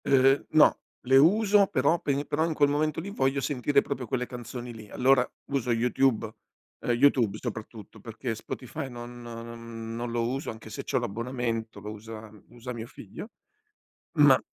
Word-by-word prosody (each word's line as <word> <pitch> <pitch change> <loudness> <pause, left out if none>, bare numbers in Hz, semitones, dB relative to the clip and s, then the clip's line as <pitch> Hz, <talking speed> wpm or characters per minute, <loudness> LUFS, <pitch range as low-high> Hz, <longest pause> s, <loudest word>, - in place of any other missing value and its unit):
Uhm, 135 +1 +4
no, 155 -1 +6 0.2
le 130 +1 +4
uso 200 +5 +5
però 145 +4 +2
pe 140 +1 -1
però 150 +3 0
in 165 -2 -2
quel 145 -1 +4
momento 150 +1 0
lì 195 +5 -5
voglio 135 -6 +1
sentire 140 0 +2
proprio 135 -4 -4
quelle 125 +2 -1
canzoni 120 0 -7
lì. 110 -2 -11
Allora 130 0 +3 0.2
uso 130 -3 0
YouTube 120 0 +2 0.5
uhm, - - -1
YouTube 120 -4 +3
soprattutto, 110 -2 -7
perché 115 +3 -4
Spotify 125 +4 -6
non 120 0 -8
non 115 -1 -7
non 120 +1 -3
lo 115 0 0
uso 135 +4 -3
anche 110 0 -8
se - - -5
c'ho - - 0
l'abbonamento, 115 0 -3
lo 105 - -7
usa 110 0 -9 0.2
usa 120 +1 -7
mio 115 -1 -6
figlio. 120 - -10 0.9
Ma - - +8
125 Hz, 165 wpm, -28 LUFS, 115-140 Hz, 0.9 s, Ma